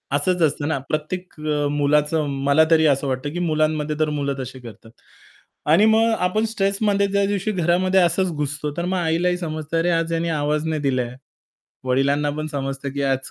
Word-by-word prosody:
असंच 180 +4 +1
असतं 150 -1 +1
ना, 160 - 0
प्रत्येक 180 +4 -3
अ, 150 -1 0
मुलाचं 150 +1 +1 0.2
मला 145 +3 +5
तरी 160 -1 +5
असं 140 -1 +2
वाटतं 130 +2 -2
की 175 - -3
मुलांमध्ये 155 -2 0
तर 155 -1 +2
मुलं 140 -2 -2
तशी 130 0 -7
करतात. 115 -2 -13 0.7
आणि 165 +8 +5
मग 220 +1 +4
आपण 185 +5 +1
स्ट्रेसमध्ये 200 0 +1
ज्या 200 0 +1
दिवशी 200 +1 -1
घरामध्ये 185 +1 +2
असंच 175 +1 +2
घुसतो, 145 0 -3
तर 170 - -1
मग 185 +1 -1
आईलाही 175 +1 +1
समजतं 155 -1 -4
अरे 175 +2 +1
आज 165 0 -2
याने 165 0 -1
आवाज 150 +2 0
नाही 155 -2 -1
दिलाय. 130 -3 -1 0.7
वडिलांना 140 +3 +1
पण 155 0 -3
समजतं 135 0 -4
की 140 0 -3
आज 135 -1 -1
155 Hz, 180 wpm, -22 LUFS, 145-180 Hz, 0.7 s, मला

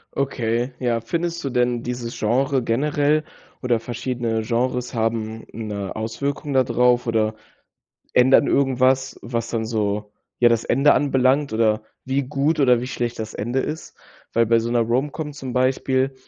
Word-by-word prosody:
Okay. 125 -2 -1
Ja, 120 -2 0
findest 170 +7 -3
du 140 - -2
denn 120 -1 +1
dieses 120 -1 -5
Genre 130 +4 +1
generell 145 +5 +1 0.4
oder 120 -3 +1
verschiedene 120 -1 -2
Genres 125 +2 -1
haben 110 -1 -2
'ne 105 -3 -5
Auswirkung 140 +7 -3
da 130 -1 +4
drauf, 125 0 +2
oder 110 -2 0 0.8
ändern 130 +3 +5
irgendwas, 130 -1 +2
was 115 -1 -3
dann 110 -1 -2
so, 105 -2 -2 0.3
ja, 120 - +6
das 115 -1 +1
Ende 140 +2 +4
anbelangt 135 0 +2
oder 110 -1 +2 0.2
wie 135 +2 0
gut 145 +3 0
oder 125 -3 +4
wie 125 - -4
schlecht 120 -2 -3
das 110 -1 -5
Ende 120 +5 -2
ist? 155 +3 -5 0.4
Weil 115 0 +3
bei 115 +1 +4
so 115 +1 -2
'ner 120 0 +2
Romcom 140 +6 -1
zum 135 -3 -6
Beispiel 130 +1 +1
125 Hz, 155 wpm, -22 LUFS, 115-135 Hz, 0.8 s, ja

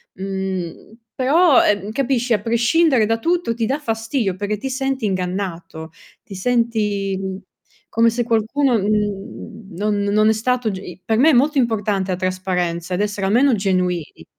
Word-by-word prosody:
Mhmm, 190 -1 -5 0.2
però, 290 +3 +4
ehm, 205 0 0
capisci, 250 -1 0
a 210 - +1
prescindere 235 +3 +3
da 225 +1 +1
tutto, 335 -3 0
ti 230 - -1
dà 270 +6 -1
fastidio 225 -5 -2
perché 205 +2 -3
ti 265 +6 -5
senti 265 -2 -2
ingannato, 180 -4 -4 0.3
ti 195 - -11
senti, 210 -3 0
mhmm, 190 -1 -4 0.5
come 230 +1 +3
se 240 +1 -1
qualcuno 235 +3 +1
mhmm, 205 0 -3
non 210 +2 0
non 210 +2 +3
è - - +4
stato 240 +1 0
g 195 - -4
i 185 -1 -10
per 220 +3 0
me 275 +7 +5
è - - +4
molto 285 +4 +3
importante 210 -6 0
la 180 - -1
trasparenza 185 -2 -2
ed 180 - 0
essere 205 -1 -2
almeno 245 +6 +3
genuini. 180 -5 -1
215 Hz, 165 wpm, -20 LUFS, 190-240 Hz, 0.5 s, me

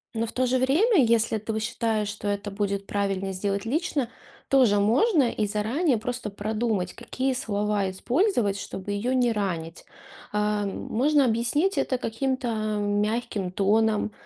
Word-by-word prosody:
но 225 +1 -1
в - - -6
то 255 - 0
же 255 +1 +1
время, 315 - +4
если 225 -1 +2
ты 220 +1 -3
считаешь, 220 -1 -1
что 205 0 -5
это 205 0 -2
будет 200 0 -2
правильно 195 -1 -1
сделать 200 +2 -2
лично, 280 -1 -1 0.4
тоже 245 -7 +4
можно, 275 - +3
и 215 -3 0
заранее 230 - +1
просто 245 0 -4
продумать, 210 -3 -2
какие 260 +3 -2
слова 210 -4 -1
использовать, 235 - +1
чтобы 195 0 -6
ее 230 +6 -1
не 245 -2 +3
ранить. 175 -6 -3 0.5
Э, 210 0 0
можно 275 +8 +1
объяснить 250 - +1
это 255 - 0
каким-то 255 +2 -2 0.3
мягким 205 -1 -1
тоном, 215 +2 +2
220 Hz, 145 wpm, -26 LUFS, 205-250 Hz, 0.5 s, время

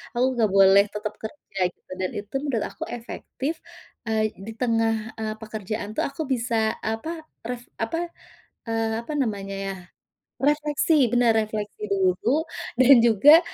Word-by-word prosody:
Aku 245 +1 +3
nggak 220 - +5
boleh 195 0 +7
tetap 210 +1 -5
kerja 220 -4 -8 0.2
gitu, - - -24
dan 185 -1 0
itu 205 +4 -7
menurut 270 -7 -1
aku - - -6
efektif, 260 +5 -5 0.5
eee, 215 -1 +1
di 215 +3 -7
tengah, 225 -2 +2 0.2
eee, 215 -1 -2
pekerjaan 215 -1 -5
tuh 215 - -1
aku 280 +3 -6
bisa, 235 -1 -1 0.2
apa, 315 +9 -4 0.2
ref 245 0 -4
apa, 330 +10 -2 0.6
eee, 225 0 0
apa 235 +6 -7
namanya 200 -4 -3
ya, 195 - -3 0.7
refleksi, 295 +2 +2 0.2
benar 245 -1 +4
refleksi 215 - -4
dulu 360 - +2 0.4
dan 260 +2 +9
juga, 285 - +8
225 Hz, 140 wpm, -25 LUFS, 215-275 Hz, 0.7 s, dan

